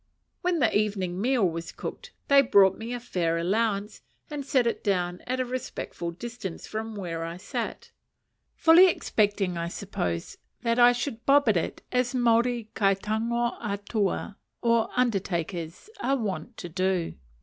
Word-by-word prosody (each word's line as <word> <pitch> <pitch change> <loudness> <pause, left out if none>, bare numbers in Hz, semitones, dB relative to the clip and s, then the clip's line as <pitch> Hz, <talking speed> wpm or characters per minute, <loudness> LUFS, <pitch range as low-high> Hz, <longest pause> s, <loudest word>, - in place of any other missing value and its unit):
When 360 -1 +1
the 240 -8 +2
evening 195 -3 0
meal 245 -4 +3
was 165 0 -5
cooked, 485 0 -7 0.2
they 280 0 +7
brought 195 -7 +5
me 225 +3 -6
a 245 - -3
fair 175 -8 -1
allowance, 205 +3 0 0.3
and 290 -1 -3
set 265 -2 +2
it 235 - -1
down 180 -3 0
at 255 +1 -1
a 255 - +1
respectful 245 -8 -5
distance 195 0 -7
from 220 0 -5
where 170 -4 -4
I 165 +1 -5
sat; 185 - -5 0.6
fully 340 +3 +7
expecting, 205 - 0
I 170 - -2
suppose, 90 - -4 0.2
that 230 0 +1
I 245 0 +8
should 240 -1 -3
bob 280 -2 +5
at 205 - +4
it 165 - -3
as 250 0 +1
Maori 235 -1 +2
kai 195 -2 +3
tango 230 +4 -1
atua, 205 -1 -2 0.3
or 230 -1 +3
undertakers, 180 - -1
are 275 -7 +1
wont 225 +1 -4
to 175 - -6
do. 185 -1 0
215 Hz, 155 wpm, -27 LUFS, 185-245 Hz, 0.6 s, I